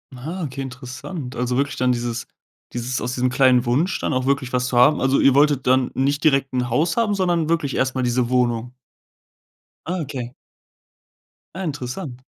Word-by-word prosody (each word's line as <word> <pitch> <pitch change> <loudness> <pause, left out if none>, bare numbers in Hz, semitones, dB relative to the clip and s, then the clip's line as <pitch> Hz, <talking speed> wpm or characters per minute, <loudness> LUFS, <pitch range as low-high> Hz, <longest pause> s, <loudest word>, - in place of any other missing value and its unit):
Aha, 160 +9 -5
okay, 135 -2 -5
interessant. 130 +2 -7
Also, 125 +1 -1
wirklich 140 +1 0
dann 125 0 +1
dieses 120 -1 -3 0.5
dieses 120 +1 -2
aus 125 +2 -3
diesem 130 0 +1
kleinen 130 -1 +4
Wunsch 145 +10 +1
dann - - -2
auch 130 0 0
wirklich 135 -2 0
was 125 0 +1
zu 125 - -1
haben. 145 +5 +5
Also 135 +1 +2
ihr 135 - +5
wolltet 140 -2 +3
dann 130 0 +3
nicht 140 +3 0
direkt 135 -3 +3
'n 125 -1 -1
Haus 155 - +1
haben, 225 -3 +2
sondern 175 -4 +1
wirklich 165 -5 0
erstmal 130 0 0
diese 120 0 +1
Wohnung. 125 -1 0 1.2
Ah, 185 +1 -1
okay. 130 -4 -5 1.2
Ah, 190 - -5
interessant. 135 -1 -5
130 Hz, 175 wpm, -22 LUFS, 125-145 Hz, 1.2 s, haben